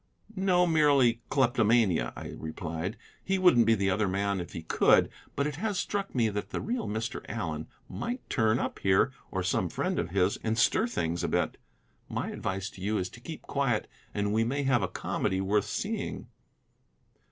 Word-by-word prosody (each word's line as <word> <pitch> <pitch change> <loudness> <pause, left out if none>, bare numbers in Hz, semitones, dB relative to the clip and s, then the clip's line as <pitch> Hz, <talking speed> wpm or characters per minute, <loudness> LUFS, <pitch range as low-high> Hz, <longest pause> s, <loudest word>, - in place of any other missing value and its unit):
"No, 185 -2 +3
merely 140 -8 +4
kleptomania," 115 - +3
I - - -7
replied; 80 +5 -5 0.3
"he 195 0 +1
wouldn't 125 - +5
be 115 - +6
the 100 -2 +1
other 100 +2 +1
man 100 +1 0
if 85 0 -8
he 80 - -6
could. - - +4 0.2
But 140 - +1
it 150 -1 -3
has 205 +1 -1
struck 200 -3 -2
me 120 -3 +3
that 105 0 -4
the - - -3
real 235 +1 -2
Mr. 110 +2 -3
Allen 80 -8 -3 0.2
might 245 +2 -5
turn 110 -1 +2
up - - -3
here, 95 -1 +3 0.2
or - - -2
some - - 0
friend - - -1
of - - -2
his, 95 +1 +2
and 110 0 -2
stir 220 - +3
things 85 - -2
a - - +1
bit. - - 0 0.5
My - - -3
advice 95 +1 -3
to 95 - -13
you 105 +3 0
is 90 -1 -2
to 115 - -13
keep 160 +6 -8
quiet, 135 -6 0 0.2
and 105 0 -1
we 110 +1 +3
may 140 +5 -1
have 130 -3 +3
a - - 0
comedy 95 - -1
worth 100 +2 +1
seeing." - - -3
110 Hz, 185 wpm, -29 LUFS, 95-140 Hz, 0.5 s, be